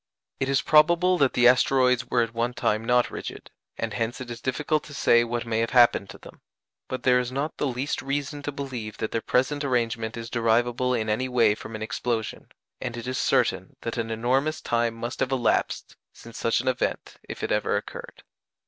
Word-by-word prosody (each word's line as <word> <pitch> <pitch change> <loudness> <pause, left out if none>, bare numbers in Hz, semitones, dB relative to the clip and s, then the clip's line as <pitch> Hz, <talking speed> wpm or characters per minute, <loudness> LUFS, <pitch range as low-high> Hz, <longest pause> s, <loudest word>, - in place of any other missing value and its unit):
It 135 - -1
is 140 - +2
probable 170 +4 +4
that 140 -3 +3
the 120 0 +5
asteroids 125 -1 +3
were 120 - +3
at 115 0 -5
one 120 +1 -1
time 110 +1 0
not 125 +1 +2
rigid, - - -7 0.3
and - - -3
hence 115 +3 -2
it 125 -1 -7
is 120 - -7
difficult 150 +3 -1
to 145 - -10
say 120 -3 +4
what 120 0 -3
may 115 -1 -1
have 115 0 0
happened 120 -5 +5
to 95 - -10
them; - - -15 0.5
but 130 - -5
there 125 -1 +4
is 125 0 -3
not 140 +4 -3
the 145 - 0
least 130 +2 -2
reason 145 +1 -3
to 145 - -4
believe 125 -7 -6
that 110 - -3
their 115 - -1
present 145 +5 0
arrangement 115 -4 -1
is 115 0 -7
derivable 120 +2 +1
in 110 -2 -2
any 110 +5 0
way 120 -4 +4
from 110 +1 -8
an 110 - -5
explosion, 110 0 -3 0.3
and 120 -2 -4
it 120 - -6
is 130 +1 -2
certain - - +1
that 115 +1 -4
an 115 -1 -2
enormous 130 +7 0
time 115 -1 0
must 120 +2 -5
have 135 0 0
elapsed 125 -3 0 0.2
since 115 0 -14
such 115 0 +1
an 130 - -9
event 130 -1 -2
if - - -6
it - - -2
ever - - +1
occurred. - - -8
120 Hz, 210 wpm, -25 LUFS, 115-135 Hz, 0.5 s, the